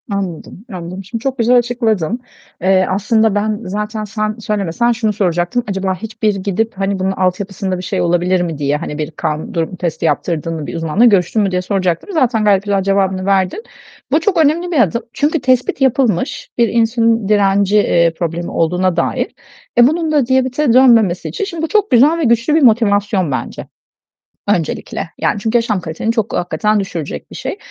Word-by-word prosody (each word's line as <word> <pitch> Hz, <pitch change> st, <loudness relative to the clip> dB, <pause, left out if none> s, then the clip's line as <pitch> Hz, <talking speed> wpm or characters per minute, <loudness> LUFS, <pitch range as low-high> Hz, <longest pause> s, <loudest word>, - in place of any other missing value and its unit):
Anladım. 195 Hz, 0 st, -5 dB
Anladım. 180 Hz, +2 st, -7 dB
Şimdi 220 Hz, +4 st, -6 dB
çok 265 Hz, +1 st, -2 dB
güzel 240 Hz, +2 st, +4 dB
açıkladın. 235 Hz, -4 st, 0 dB, 0.4 s
Eee, 185 Hz, +1 st, +3 dB
aslında 215 Hz, +2 st, +1 dB
ben 210 Hz, 0 st, -1 dB
zaten 210 Hz, +3 st, -4 dB
sen 215 Hz, 0 st, -3 dB
söylemesen, 210 Hz, +1 st, 0 dB
şunu 225 Hz, -2 st, 0 dB
soracaktım. 180 Hz, +4 st, 0 dB
Acaba 190 Hz, -1 st, -1 dB
hiçbir 220 Hz, +1 st, -2 dB
gidip, 200 Hz, +4 st, -2 dB
hani 195 Hz, 0 st, -1 dB
bunun 190 Hz, +1 st, 0 dB
altyapısında 190 Hz, 0 st, -2 dB
bir 180 Hz, -, -7 dB
şey -, -, -2 dB
olabilir 175 Hz, +1 st, +1 dB
mi 165 Hz, -4 st, -3 dB
diye, 145 Hz, 0 st, 0 dB
hani 150 Hz, 0 st, -6 dB
bir 155 Hz, 0 st, -4 dB
kan 155 Hz, -1 st, -4 dB
durumu 165 Hz, +2 st, -2 dB
testi 170 Hz, -2 st, -3 dB
yaptırdın 165 Hz, +2 st, -1 dB
mı? 155 Hz, -2 st, -5 dB
Bir -, -, -6 dB
uzmanla 165 Hz, +7 st, +2 dB
görüştün 205 Hz, -1 st, +3 dB
mü, 195 Hz, -2 st, 0 dB
diye 180 Hz, 0 st, 0 dB
soracaktım. 185 Hz, -, -1 dB
Zaten 250 Hz, -8 st, +1 dB
gayet 200 Hz, -2 st, +3 dB
güzel 200 Hz, -2 st, 0 dB
cevabını 190 Hz, -1 st, 0 dB
verdin. 195 Hz, -, 0 dB, 0.5 s
Bu -, -, +4 dB
çok 400 Hz, -4 st, 0 dB
önemli 340 Hz, +5 st, 0 dB
bir 315 Hz, -, +1 dB
adım. 235 Hz, +3 st, 0 dB
Çünkü 300 Hz, +1 st, 0 dB
tespit 255 Hz, +1 st, +1 dB
yapılmış: 265 Hz, -, 0 dB
Bir 235 Hz, -1 st, +4 dB
insülin 230 Hz, -1 st, +1 dB
direnci, 200 Hz, 0 st, +3 dB
eee, 170 Hz, -5 st, +3 dB
problemi 170 Hz, 0 st, -3 dB
olduğuna 180 Hz, +2 st, 0 dB
dair. -, -, 0 dB, 0.5 s
E, 240 Hz, 0 st, +7 dB
bunun 320 Hz, +2 st, -1 dB
da 290 Hz, -4 st, +2 dB
diyabete 260 Hz, +1 st, +1 dB
dönmemesi 230 Hz, -8 st, +4 dB
için 410 Hz, -, -4 dB
şimdi 340 Hz, -5 st, -6 dB
bu -, -, 0 dB
çok 420 Hz, +3 st, +1 dB
güzel 280 Hz, +7 st, +5 dB
ve -, -, 0 dB
güçlü 235 Hz, +4 st, +2 dB
bir 320 Hz, -, +3 dB
motivasyon 205 Hz, -, +2 dB
bence, 130 Hz, -2 st, -5 dB, 0.8 s
öncelikle. 175 Hz, -2 st, -2 dB
Yani, 205 Hz, -, 0 dB
çünkü 225 Hz, +3 st, +1 dB
yaşam 220 Hz, -4 st, -1 dB
kaliteni 165 Hz, +7 st, -3 dB
çok, 225 Hz, -2 st, -2 dB
hakikaten 180 Hz, +5 st, 0 dB
düşürecek 170 Hz, -6 st, -6 dB
bir -, -, -9 dB
şey. -, -, -4 dB
205 Hz, 180 wpm, -16 LUFS, 180-235 Hz, 0.8 s, E